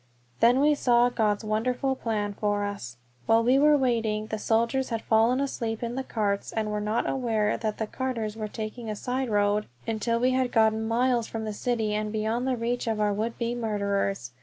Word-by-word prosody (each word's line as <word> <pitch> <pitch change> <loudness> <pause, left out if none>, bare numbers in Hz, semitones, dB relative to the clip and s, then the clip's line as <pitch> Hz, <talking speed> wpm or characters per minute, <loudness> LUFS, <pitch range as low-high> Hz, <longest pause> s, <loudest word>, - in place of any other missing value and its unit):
Then 245 +3 +5
we 300 +1 +5
saw 245 -3 +3
God's 215 -4 0
wonderful 250 +5 0
plan 210 -4 -2
for 205 0 -1
us. 160 -13 -5 0.3
While 225 0 +4
we 255 +3 +4
were 300 +1 +5
waiting 225 -5 0
the 215 0 -4
soldiers 235 +5 +1
had 230 -2 -3
fallen 230 +3 +3
asleep 235 -5 -2
in 235 0 -3
the 265 +1 -3
carts, 205 -5 -2
and 215 -1 -2
were 210 0 -2
not 215 +2 0
aware 225 -5 0
that 215 -2 -3
the 220 - -1
carters 230 -3 -3
were 215 -1 -4
taking 220 +2 -6
a 215 - -2
side 255 +3 -2
road 205 0 +1 0.2
until 230 +1 -1
we 250 +2 +3
had 255 -1 +1
gotten 220 -1 +2
miles 240 0 +1
from 225 -1 -5
the 215 - -3
city 220 -1 -1
and 210 0 -2
beyond 220 +4 -1
the 255 -2 0
reach 240 +1 -2
of 220 -1 0
our 210 -1 +2
would 220 +3 -2
be 235 0 -1
murderers! 200 - -1
225 Hz, 205 wpm, -27 LUFS, 215-245 Hz, 0.3 s, Then